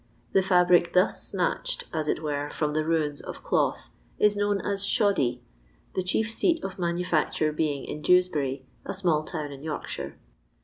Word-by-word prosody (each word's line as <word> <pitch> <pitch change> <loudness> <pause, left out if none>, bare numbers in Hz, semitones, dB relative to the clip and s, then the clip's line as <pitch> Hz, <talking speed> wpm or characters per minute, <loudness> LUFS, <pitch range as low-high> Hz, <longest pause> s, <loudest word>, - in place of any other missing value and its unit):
The 195 - +4
fabric 180 -2 +4
thus 180 +2 +3
snatched, - - 0
as 155 -2 -1
it 155 - -1
were, 145 -1 -2
from 150 0 -2
the 155 0 +1
ruins 155 -3 0
of - - -8
cloth, - - 0 0.3
is 210 0 +4
known 205 0 +1
as 200 -1 -1
shoddy, 200 - +1 0.5
the - - 0
chief 215 +5 0
seat 330 +8 +2
of 195 -1 -5
manufacture 170 -3 0
being 150 -3 -1
in 150 - -6
Dewsbury, 150 -7 +2 0.2
a - - -4
small 170 -5 +2
town 155 -3 -4
in 140 -1 -9
Yorkshire. 155 0 -5
170 Hz, 165 wpm, -27 LUFS, 150-190 Hz, 0.5 s, The